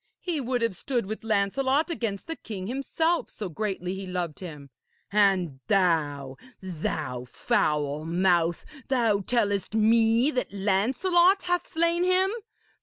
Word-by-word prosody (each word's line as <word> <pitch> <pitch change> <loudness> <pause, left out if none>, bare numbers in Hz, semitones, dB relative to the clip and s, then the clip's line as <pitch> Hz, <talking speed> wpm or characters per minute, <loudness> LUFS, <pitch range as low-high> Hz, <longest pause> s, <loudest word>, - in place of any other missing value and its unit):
He 335 -5 -2
would 250 -1 -1
have 230 -5 0
stood 245 +2 -2
with 215 +3 -6
Lancelot 260 - +1
against 225 -10 -3
the 325 - -4
king 200 -10 -7
himself, 275 - -1
so 205 -4 -6
greatly 185 0 -3
he 190 0 -6
loved 175 -4 -3
him. 150 -7 -9 0.4
And 190 -9 +2
thou 145 -8 +1 0.2
thou 155 -8 -4
foul 150 +4 0
mouth! 175 -1 +1 0.2
thou 230 -6 +2
tellest 205 -2 0
me 225 +4 +4
that 250 -2 -2
Lancelot 260 - +2
hath 355 0 -1
slain 335 +2 +2
him! 370 +1 +4
205 Hz, 130 wpm, -26 LUFS, 180-265 Hz, 0.4 s, me